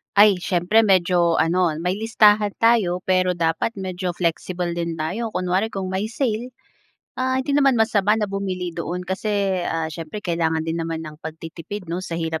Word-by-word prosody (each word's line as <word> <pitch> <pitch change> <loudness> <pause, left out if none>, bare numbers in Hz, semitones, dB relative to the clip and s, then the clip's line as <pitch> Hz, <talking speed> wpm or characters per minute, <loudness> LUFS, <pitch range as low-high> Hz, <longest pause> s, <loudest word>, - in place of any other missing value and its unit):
Ay 205 -1 +7
siyempre, 180 +5 +2
medyo 175 -3 +3
ano 170 0 +2
may 180 +3 -1
listahan 210 -2 +3
tayo 215 -6 +3
pero 185 0 +2
dapat 165 +5 0
medyo 185 -2 -4
flexible 175 +1 -2
din 170 -1 -2
tayo 180 +9 -3
kunwari 185 +4 0
kung 190 -1 -3
may 190 +2 -1
sale, 240 +1 -2 0.7
ah, 260 0 +1
hindi 265 +2 -1
naman 275 -3 +4
masama 215 -2 +3
na 220 - 0
bumili 190 -3 -3
doon 175 +2 -4
kasi, 195 0 -1
ah, 165 0 -1
siyempre 165 +6 -7
kailangan 160 -2 0
din 165 +1 -2
naman 165 0 -4
ng 155 0 -10
pagtitipid 165 +3 -7
'no 175 - -2
sa 175 -3 -5
hirap 160 -1 -2
185 Hz, 170 wpm, -22 LUFS, 170-210 Hz, 0.7 s, Ay